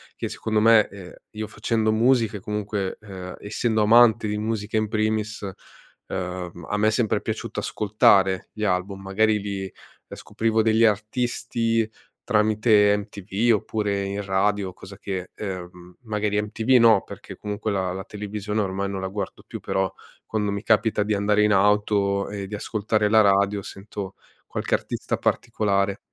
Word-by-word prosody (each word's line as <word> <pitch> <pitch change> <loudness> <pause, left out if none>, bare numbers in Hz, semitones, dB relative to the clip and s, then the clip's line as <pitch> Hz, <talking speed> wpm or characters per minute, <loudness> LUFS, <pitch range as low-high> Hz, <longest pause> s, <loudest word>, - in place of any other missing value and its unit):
che - - -4
secondo 110 -1 -1
me, 110 -1 +6
ehm, 95 -3 -11 0.2
io 110 0 -5
facendo 110 0 0
musica, 115 -2 +2
comunque, 105 -1 -3
ehm, 95 -3 -8
essendo 110 +1 0
amante 115 0 +5
di 105 0 -2
musica 110 0 -2
in 110 0 +1
primis, 110 0 -1 0.6
ehm, 90 -2 -5
a 105 - 0
me 105 +1 +3
è - - +4
sempre 110 -1 +1
piaciuto - - -4
ascoltare 95 -3 +2
gli 110 - -5
album. 95 0 -1
Magari 105 +2 +2
li 100 -1 -4
ehm, 95 - -10 0.4
scoprivo 110 0 0
degli 110 +1 +3
artisti 115 +1 0 0.3
tramite 105 -2 +4
MTV, 105 +2 -1
oppure 100 -1 -2
in 100 +1 -3
radio 95 0 0
cosa 100 +2 -12
che 95 -2 -5
ehm, 90 -3 -7
magari 105 -2 0
MTV 110 +3 -5
no 115 -4 +6
perché - - -10
comunque 105 +1 -3
la 95 -2 -1
la 95 - -5
televisione 105 0 -4
ormai 100 0 -2
non 95 -1 -4
la 95 - -2
guardo 95 -1 -5
più, - - -7
però 95 -1 -1 0.3
quando 105 -2 -1
mi 100 0 -3
capita 110 -1 +2
di 105 +1 -1
andare 105 +1 +2
in 105 - +3
auto 100 0 +2
e 100 -1 -5
di 105 - -5
ascoltare 105 0 0
la 110 0 +6
radio 100 0 +3
sento 100 0 -8 0.3
qualche - - -4
artista - - -1
particolare. 100 -2 0
105 Hz, 155 wpm, -24 LUFS, 100-110 Hz, 0.6 s, me